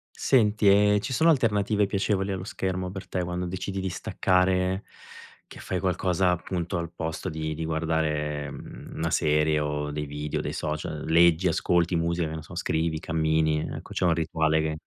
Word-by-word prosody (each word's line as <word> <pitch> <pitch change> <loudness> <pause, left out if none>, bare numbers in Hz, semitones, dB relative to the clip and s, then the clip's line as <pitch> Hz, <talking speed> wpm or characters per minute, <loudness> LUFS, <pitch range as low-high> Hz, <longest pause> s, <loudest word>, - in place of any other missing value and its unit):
Senti, 105 -5 +3
ehm, 105 +1 +5
ci 130 - -4
sono 160 +6 +4
alternative 105 -6 +2
piacevoli 100 0 0
allo 95 -1 -4
schermo 95 -5 -3
per 95 +1 -7
te 90 - -1
quando 90 +1 -3
decidi 95 +2 -4
di 95 - -2
staccare, 95 +1 +1 0.6
che - - -12
fai 95 - -3
qualcosa, 90 0 +1
appunto, 90 +1 -2
al 85 -1 -4
posto 80 +3 -4
di 80 -2 -3
di 80 +1 -4
guardare, 75 -2 -1
mhmm, - - -10
una 80 0 -1
serie 75 -1 +2
o 75 0 -2
dei 75 0 -3
video, 75 +1 -3
dei - - -3
social? 75 0 -4
Leggi, 85 +2 +5
ascolti 85 +1 +1
musica, 85 0 0
che 80 - -5
ne 80 - -7
so, 80 - -12
scrivi, 80 -2 0
cammini, 80 -1 +1
ehm, - - -4
ecco, - - -9
c'è - - -1
un 85 -2 +4
rituale 80 -1 +1
che 80 0 -2
85 Hz, 180 wpm, -26 LUFS, 80-95 Hz, 0.6 s, ehm